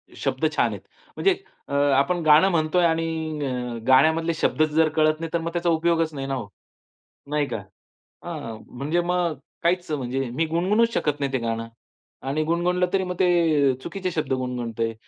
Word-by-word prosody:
शब्द - - -1
छान - - +3
आहेत. - - -8 0.4
म्हणजे 390 -1 +3 0.3
अ, 140 - -5 0.2
आपण 175 +5 +1
गाणं 155 +5 +6
म्हणतो 160 0 +1
आहे 175 -1 +5
आणि 160 -1 -2
अ, 125 -2 -3
गाण्यामधले 160 +5 +4
शब्द 155 - +1
जर 155 +1 +2
कळत 155 0 +3
नाही, 165 0 -4
तर 170 - +2
मग 165 +1 -3
त्याचा 175 0 0
उपयोगच 165 -1 +1
नाही 135 -1 -4
ना 135 - -2
हो. 115 -6 -5 0.8
नाही 150 -1 +1
का? - - -3 0.7
हां, 145 -10 -6
म्हणजे 145 +7 -1
मग 175 -2 0 0.3
काहीच 175 0 +1
म्हणजे 135 -2 -2
मी 165 - +1
गुणगुणूच 200 +8 +2
शकत 145 -1 0
नाही 140 -1 -1
ते 130 - +1
गाणं 115 -1 -3 0.6
आणि 150 +3 0
गुणगुणलं 175 +3 +1
तरी 190 -1 +1
मग 180 0 -4
ते - - +5 0.5
अ, - - -4
चुकीचे 185 +2 -4
शब्द 155 -5 -2
गुणगुणतो 125 -3 -3
आहे 115 0 -1
160 Hz, 185 wpm, -24 LUFS, 135-170 Hz, 0.8 s, गाणं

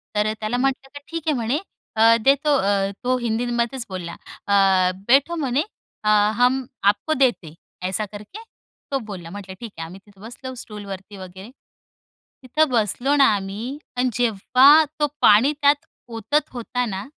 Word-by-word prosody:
तर 210 +1 +1
त्याला 220 +3 -2
म्हटलं 270 +1 -1
की 285 - -6
ठीक 330 -1 -5
आहे 305 - +2
म्हणे 240 +4 -1 0.6
देतो, 280 +3 +3
अ, 195 -3 +1
तो 255 +1 +1
हिंदीमध्येच 240 +1 -2
बोलला 180 -3 -6 0.3
अ, 195 -2 +4 0.2
"बैठो" 280 +7 +4
म्हणे 280 -2 0 0.4
अ, 210 - +1 0.3
"हम 250 +1 +2 0.3
आपको 315 +9 -3
देते, 240 - 0 0.3
ऐसा 195 +3 -1
करके." 210 - -10 0.5
तो 275 - 0
बोलला, 185 -5 -8
म्हटलं 195 0 -8
ठीक 235 -3 -8
आहे. 165 - -5
आम्ही 180 +4 -11
तिथं 200 -2 -21
बसलो 245 +4 -8
स्टूलवरती 205 -3 -8
वगैरे. 190 +3 -10 0.9
तिथं 305 +5 +1
बसलो 245 +4 +1
ना 280 -1 +6
आम्ही, 205 +7 -5 0.2
आणि 250 +1 +1
जेव्हा 250 +7 +5 0.2
तो 295 - +2
पाणी 225 +8 +6
त्यात 285 0 +3 0.2
ओतत 275 +7 -1
होता 245 0 -3
ना 195 -1 -5
235 Hz, 150 wpm, -22 LUFS, 200-270 Hz, 0.9 s, ना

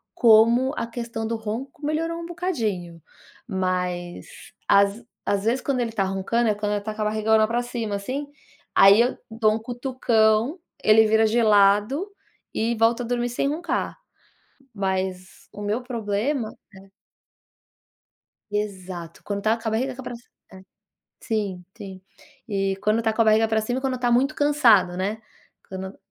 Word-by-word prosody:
como 235 +4 +5
a 230 - -2
questão 230 -1 -5
do 230 - -2
ronco 260 +8 -6
melhorou 330 +2 -1
um - - -6
bocadinho. 215 - -3 0.5
Mas, 180 -2 -2 0.4
às 200 +3 +3 0.2
às 200 +1 0
vezes, 245 +3 +2
quando 270 -3 -1
ele 230 -1 -2
tá 205 -3 0
roncando, 195 +5 0
é - - +3
quando 210 0 -2
ele 205 - -1
tá 215 +1 -5
com 215 - -5
a - - 0
barriga 215 +1 +2
lá 215 0 +4
pra 240 +1 0
cima 230 -4 -3
assim, 260 +8 -4 0.5
aí 200 +3 +7
eu 245 - 0
dou 220 -1 +2
um - - -3
cutucão, 240 - +1 0.2
ele 215 0 +6
vira 220 +1 +4
de 230 +2 +2
lado, 210 - +3 0.4
e 230 +1 0
volta 230 +2 +2
a - - -5
dormir 245 0 -1
sem 245 +3 -1
roncar. 335 +4 -2 0.8
Mas, 190 -1 -3
o 205 - -8
meu 210 +4 -1
problema, 230 +1 -2 0.2
né 195 +1 -15 1.6
Exato, 185 -5 -5
quando 200 -1 -3
tá 220 +1 +2
com 225 0 -4
a - - 0
barriga 255 +4 -1
ca 265 - -9
pra 245 - -6
cima 235 - -14
é. - - -63 0.9
Sim, 200 -6 -3
sim. 195 -3 -9 0.5
E 195 -1 -1
quando 215 +3 0
tá 220 -1 +1
com 230 - +2
a - - +2
barriga 220 +1 +4
pra 220 0 +1
cima, 245 +4 -2
e - - -4
quando 260 -2 -2
tá 245 -1 +1
muito 270 +5 +2
cansado, 230 -12 +4
né, 205 +4 -2 0.5
quando 190 +1 -7
220 Hz, 170 wpm, -24 LUFS, 200-245 Hz, 1.6 s, aí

